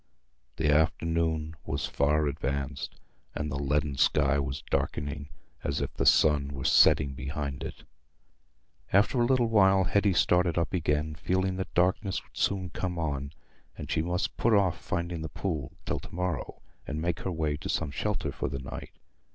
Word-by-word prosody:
The 75 Hz, -2 st, +2 dB
afternoon 80 Hz, 0 st, +1 dB
was 70 Hz, +1 st, -2 dB
far 75 Hz, +2 st, +2 dB
advanced, 70 Hz, 0 st, -3 dB, 0.4 s
and 75 Hz, 0 st, -3 dB
the 70 Hz, -, -2 dB
leaden 70 Hz, 0 st, 0 dB
sky 70 Hz, -, +3 dB
was 65 Hz, -1 st, -3 dB
darkening, 70 Hz, 0 st, -2 dB, 0.3 s
as 70 Hz, -, -1 dB
if -, -, -3 dB
the -, -, 0 dB
sun 75 Hz, -2 st, +5 dB
were 70 Hz, -2 st, -6 dB
setting 70 Hz, -2 st, +5 dB
behind 70 Hz, +1 st, -4 dB
it. -, -, -7 dB, 1.1 s
After 105 Hz, +6 st, +4 dB
a -, -, +4 dB
little 130 Hz, -2 st, +3 dB
while 95 Hz, -4 st, +5 dB
Hetty 100 Hz, +2 st, +2 dB
started 90 Hz, -1 st, +3 dB
up 85 Hz, +2 st, 0 dB
again, 75 Hz, -3 st, 0 dB
feeling 95 Hz, +4 st, -1 dB
that 95 Hz, -, -4 dB
darkness 95 Hz, +2 st, +1 dB
would -, -, -26 dB
soon 95 Hz, -3 st, 0 dB
come 90 Hz, 0 st, -3 dB
on; 70 Hz, -3 st, -2 dB, 0.4 s
and -, -, -6 dB
she 80 Hz, -, +2 dB
must 90 Hz, +2 st, -2 dB
put 115 Hz, -1 st, +3 dB
off 95 Hz, -4 st, +2 dB
finding 85 Hz, -1 st, -3 dB
the 80 Hz, -, -4 dB
pool 80 Hz, -8 st, -3 dB
till -, -, -1 dB
to -, -, -12 dB
morrow, 90 Hz, -4 st, -3 dB, 0.2 s
and 75 Hz, +1 st, -3 dB
make 85 Hz, +1 st, -1 dB
her 95 Hz, -, -3 dB
way 80 Hz, -3 st, -1 dB
to -, -, -7 dB
some 70 Hz, -, -1 dB
shelter 95 Hz, -2 st, -2 dB
for -, -, -3 dB
the 70 Hz, -, -4 dB
night. 65 Hz, 0 st, -7 dB
80 Hz, 170 wpm, -29 LUFS, 70-90 Hz, 1.1 s, sun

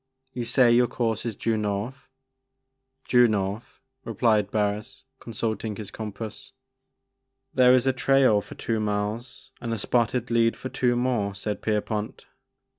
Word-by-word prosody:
You 120 Hz, -2 st, -3 dB
say 120 Hz, 0 st, +4 dB
your 120 Hz, +1 st, +5 dB
course 115 Hz, -1 st, -2 dB
is 115 Hz, -, -3 dB
due 115 Hz, +2 st, 0 dB
north? 105 Hz, +6 st, -3 dB, 0.3 s
' 130 Hz, 0 st, -54 dB
' 130 Hz, 0 st, -38 dB
Due 125 Hz, -1 st, +6 dB
north/' 100 Hz, 0 st, -3 dB, 0.2 s
replied 110 Hz, -3 st, +1 dB
Barris, 105 Hz, +5 st, -2 dB, 0.2 s
consulting 110 Hz, -1 st, -3 dB
his 105 Hz, -1 st, -7 dB
compass. 110 Hz, +3 st, -7 dB, 0.5 s
'< 130 Hz, 0 st, -54 dB
There 125 Hz, -1 st, +6 dB
is 130 Hz, 0 st, +2 dB
a 135 Hz, -, +3 dB
trail 130 Hz, -4 st, +4 dB
for -, -, -11 dB
two 115 Hz, -1 st, -2 dB
miles 105 Hz, +3 st, -3 dB
and 115 Hz, -, -4 dB
a 115 Hz, -, -1 dB
spotted 120 Hz, +2 st, 0 dB
lead 115 Hz, 0 st, +3 dB
for 130 Hz, -, -6 dB
two 125 Hz, -2 st, +1 dB
more," 120 Hz, -5 st, 0 dB
said 105 Hz, +1 st, -4 dB
Pierpont. 105 Hz, 0 st, -2 dB
115 Hz, 155 wpm, -25 LUFS, 105-130 Hz, 0.5 s, Due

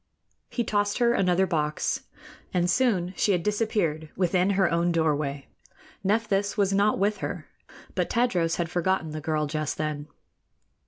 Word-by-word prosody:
He 240 Hz, -, -1 dB
tossed 205 Hz, -2 st, 0 dB
her 240 Hz, -1 st, +3 dB
another 185 Hz, -2 st, +3 dB
box, 165 Hz, -, -1 dB, 0.5 s
and 175 Hz, -1 st, +2 dB
soon 185 Hz, -4 st, +1 dB
she 205 Hz, -, +2 dB
had 175 Hz, -2 st, 0 dB
disappeared 205 Hz, -8 st, 0 dB
within 180 Hz, +1 st, +2 dB
her 190 Hz, -3 st, +4 dB
own 170 Hz, +1 st, +2 dB
doorway. 150 Hz, -4 st, 0 dB, 0.6 s
Nephthys 205 Hz, 0 st, +1 dB
was 200 Hz, -1 st, +2 dB
not 200 Hz, +2 st, +3 dB
with 205 Hz, +2 st, +1 dB
her, -, -, -5 dB, 0.5 s
but -, -, -1 dB
Tadros 180 Hz, -9 st, +1 dB
had 175 Hz, -, -1 dB
forgotten 175 Hz, -1 st, 0 dB
the 155 Hz, 0 st, -5 dB
girl 155 Hz, 0 st, 0 dB
just 155 Hz, 0 st, -3 dB
then. 150 Hz, -1 st, -3 dB
180 Hz, 150 wpm, -26 LUFS, 160-205 Hz, 0.6 s, her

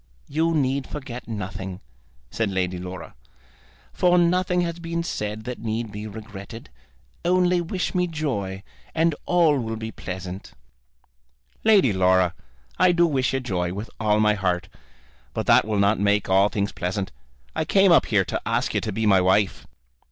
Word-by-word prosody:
You 165 Hz, +3 st, +1 dB
need 135 Hz, -2 st, 0 dB
forget 130 Hz, -4 st, -7 dB
nothing," 95 Hz, -3 st, -5 dB, 0.5 s
said 115 Hz, -2 st, -1 dB
Lady 90 Hz, -2 st, -1 dB
Laura, 90 Hz, +1 st, -8 dB, 0.8 s
"for 180 Hz, 0 st, +3 dB
nothing 180 Hz, +1 st, +2 dB
has 170 Hz, -1 st, -3 dB
been 170 Hz, 0 st, -3 dB
said 105 Hz, -8 st, -4 dB
that 125 Hz, +1 st, -6 dB
need 110 Hz, 0 st, -3 dB
be 105 Hz, +1 st, -6 dB
regretted. 110 Hz, -, -9 dB, 0.5 s
Only 180 Hz, 0 st, +3 dB
wish 175 Hz, +2 st, -3 dB
me 180 Hz, -1 st, +1 dB
joy, 105 Hz, -, -3 dB, 0.3 s
and 165 Hz, 0 st, +3 dB
all 165 Hz, -5 st, +4 dB
will 115 Hz, -2 st, -3 dB
be 110 Hz, 0 st, -5 dB
pleasant." 95 Hz, -1 st, -7 dB, 1.1 s
"Lady 200 Hz, -, +5 dB
Laura, 95 Hz, -1 st, +3 dB, 0.5 s
I 185 Hz, 0 st, +5 dB
do 170 Hz, 0 st, +4 dB
wish 135 Hz, -6 st, +1 dB
you -, -, +1 dB
joy, 90 Hz, -7 st, -2 dB
with 105 Hz, +2 st, -6 dB
all 105 Hz, -1 st, +2 dB
my 105 Hz, 0 st, +4 dB
heart, 90 Hz, -4 st, -1 dB, 0.7 s
but -, -, -2 dB
that -, -, +5 dB
will 110 Hz, -1 st, -1 dB
not 100 Hz, +2 st, +3 dB
make 100 Hz, 0 st, +2 dB
all 95 Hz, +2 st, +4 dB
things 100 Hz, -2 st, -1 dB
pleasant. 95 Hz, +2 st, -3 dB, 0.4 s
I -, -, 0 dB
came 195 Hz, +3 st, +4 dB
up 170 Hz, -, +5 dB
here 100 Hz, -4 st, +2 dB
to -, -, -3 dB
ask -, -, 0 dB
you -, -, +1 dB
to 110 Hz, -, -3 dB
be 110 Hz, +2 st, -1 dB
my 95 Hz, -3 st, +5 dB
wife." 95 Hz, +2 st, +1 dB
110 Hz, 165 wpm, -24 LUFS, 95-165 Hz, 1.1 s, Lady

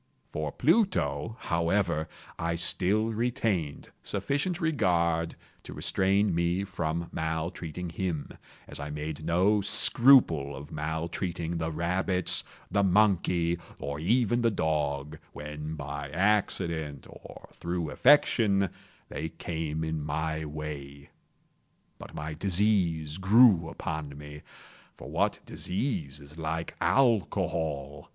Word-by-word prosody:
For 75 Hz, 0 st, -3 dB
Pluto, 120 Hz, -, +1 dB
however, 85 Hz, -1 st, 0 dB, 0.3 s
I 85 Hz, 0 st, 0 dB
still 95 Hz, +6 st, +1 dB
retained 110 Hz, -, -1 dB
sufficient 150 Hz, +5 st, -1 dB
regard 85 Hz, -, +1 dB, 0.3 s
to -, -, -9 dB
restrain 100 Hz, +1 st, +2 dB
me 85 Hz, +3 st, +1 dB
from 85 Hz, -3 st, -2 dB
maltreating 80 Hz, +1 st, -3 dB
him, 85 Hz, -4 st, -3 dB, 0.4 s
as -, -, -7 dB
I 70 Hz, +1 st, -5 dB
made 75 Hz, +1 st, -5 dB
no 95 Hz, +6 st, +3 dB
scruple 100 Hz, -, +4 dB
of 70 Hz, +2 st, -9 dB
maltreating 80 Hz, +2 st, -3 dB
the 80 Hz, 0 st, -1 dB
rabbits, 90 Hz, +3 st, 0 dB, 0.3 s
the 100 Hz, -, +3 dB
monkey, 90 Hz, -4 st, +3 dB, 0.2 s
or 70 Hz, +1 st, -4 dB
even 120 Hz, +6 st, +2 dB
the 115 Hz, -, +4 dB
dog, 75 Hz, -5 st, -1 dB
when 75 Hz, +1 st, -6 dB
by 70 Hz, -1 st, -5 dB
accident, 85 Hz, -6 st, 0 dB
or -, -, -12 dB
through 85 Hz, -3 st, -3 dB
affection, 110 Hz, -, +4 dB, 0.4 s
they 80 Hz, -, -4 dB
came 80 Hz, -1 st, -4 dB
in 80 Hz, -1 st, -2 dB
my 80 Hz, +1 st, -2 dB
way. 70 Hz, -2 st, -7 dB, 0.9 s
But -, -, -10 dB
my 75 Hz, +1 st, -4 dB
disease 90 Hz, -3 st, +1 dB
grew 95 Hz, -4 st, +6 dB
upon 75 Hz, -3 st, -5 dB
me—for 75 Hz, 0 st, -13 dB
what -, -, +1 dB
disease 90 Hz, -, -3 dB
is 70 Hz, +3 st, -12 dB
like 80 Hz, +1 st, -3 dB
Alcohol! 80 Hz, -, +1 dB
85 Hz, 110 wpm, -29 LUFS, 75-100 Hz, 0.9 s, grew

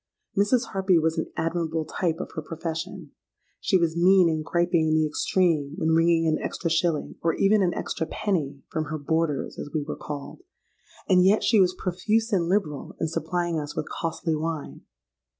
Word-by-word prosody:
Mrs. 230 Hz, +4 st, +2 dB
Harpy 190 Hz, -2 st, +3 dB
was 160 Hz, +1 st, +1 dB
an -, -, -4 dB
admirable 165 Hz, -1 st, -1 dB
type 165 Hz, +1 st, -1 dB
of -, -, -5 dB
her 160 Hz, -, -4 dB
profession. 165 Hz, +2 st, -5 dB, 0.5 s
She 190 Hz, -, +2 dB
was 170 Hz, -2 st, 0 dB
mean 180 Hz, 0 st, +5 dB
and 155 Hz, -1 st, -1 dB
griping 170 Hz, -1 st, +1 dB
in 155 Hz, -, +2 dB
the 155 Hz, 0 st, +3 dB
extreme 155 Hz, -2 st, +1 dB
when 160 Hz, -, 0 dB
wringing 165 Hz, 0 st, +3 dB
an 155 Hz, -1 st, +1 dB
extra 165 Hz, -, -3 dB
shilling, 165 Hz, -2 st, 0 dB
or 165 Hz, -1 st, +1 dB
even 205 Hz, +1 st, +3 dB
an 175 Hz, -2 st, +1 dB
extra 160 Hz, -, -3 dB
penny, 145 Hz, -9 st, -2 dB
from 155 Hz, -1 st, -1 dB
her 155 Hz, 0 st, -4 dB
boarders, 155 Hz, -1 st, -1 dB
as -, -, -5 dB
we 150 Hz, -, 0 dB
were 150 Hz, -, -5 dB
called; 145 Hz, -, -7 dB, 0.7 s
and 185 Hz, -2 st, +5 dB
yet 200 Hz, +3 st, +4 dB
she 220 Hz, -4 st, +5 dB
was 180 Hz, -1 st, +2 dB
profuse 215 Hz, +5 st, 0 dB
and 170 Hz, -3 st, +1 dB
liberal 165 Hz, -8 st, -1 dB
in 165 Hz, -, -1 dB
supplying 170 Hz, +1 st, -1 dB
us 145 Hz, -1 st, -6 dB
with -, -, -3 dB
costly 165 Hz, -1 st, -2 dB
wine. 155 Hz, -, -4 dB
165 Hz, 185 wpm, -25 LUFS, 155-185 Hz, 0.7 s, mean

